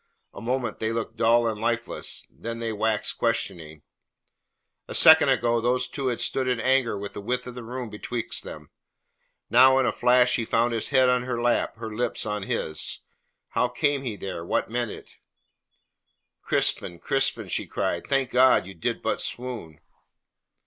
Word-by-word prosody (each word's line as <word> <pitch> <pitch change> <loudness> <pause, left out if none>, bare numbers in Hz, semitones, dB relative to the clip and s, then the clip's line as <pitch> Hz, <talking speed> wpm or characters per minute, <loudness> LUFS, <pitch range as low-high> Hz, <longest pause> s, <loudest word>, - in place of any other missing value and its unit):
A - - -9
moment 120 -1 -2
they 110 0 -1
looked 115 0 -4
dull 115 +1 +4
and 110 -2 -3
lifeless, 115 0 -2
then 115 0 -6
they 115 -1 -3
waxed 110 0 -1
questioning. 80 -2 -2 1.0
A - - -5
second - - +8
ago 120 -1 +2
these 125 +2 +1
two 140 -3 -4
had 120 -2 -1
stood 130 -1 -1
in 125 -2 0
anger 125 -2 +2
with 100 0 -6
the - - -6
width 125 +4 -2
of 125 - -7
the 125 - -8
room 120 0 -6
betwixt 115 +2 -4
them; - - -10 0.8
now, 130 +3 +7
in 135 - +3
a 115 - +2
flash, 125 0 +3
he 115 - -1
found 115 +2 +1
his 115 - -1
head 130 -2 +4
on 125 0 +3
her 125 -1 -3
lap, 120 0 +1
her 110 -1 -7
lips 120 +1 -2
on 105 -1 -3
his. 80 -5 -3 0.5
How 125 - +1
came 140 +3 0
he 120 -6 -4
there? 95 -4 -6
What 85 - -1
meant 120 -1 -1
it? - - -11 1.2
"Crispin, 85 - 0
Crispin," 135 +9 0
she - - -2
cried, 85 - -2
"thank 135 -2 0
God 130 -5 +5
you 95 - -9
did 85 - -3
but - - -1
swoon!" 115 -11 -5
120 Hz, 175 wpm, -25 LUFS, 110-125 Hz, 1.2 s, second